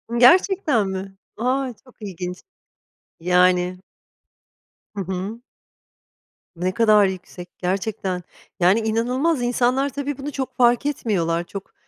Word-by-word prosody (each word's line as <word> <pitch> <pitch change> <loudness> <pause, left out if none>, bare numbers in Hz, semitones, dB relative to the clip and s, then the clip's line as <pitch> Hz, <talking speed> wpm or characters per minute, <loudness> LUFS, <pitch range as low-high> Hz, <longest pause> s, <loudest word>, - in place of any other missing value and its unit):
I - - 0
gerçekten 290 - +5
mi? 190 0 -5 0.2
A! 255 +2 0
Çok 255 - -19
ilginç. 180 -3 -6 0.8
Yani 180 +1 +3 1.2
Hı 200 - -2
hı. 190 +6 -5 1.1
Ne 180 +2 -1
kadar 215 -3 +5
yüksek 180 -1 -6
gerçekten. 185 -1 -2 0.4
Yani 185 +5 +4
inanılmaz. 245 +7 0
İnsanlar 250 +3 +1
tabii 285 +1 -4
bunu 285 +2 -5
çok 265 -1 -5
fark 240 +2 +4
etmiyorlar. 175 - 0
Çok, 195 +3 -9
215 Hz, 110 wpm, -22 LUFS, 185-255 Hz, 1.2 s, gerçekten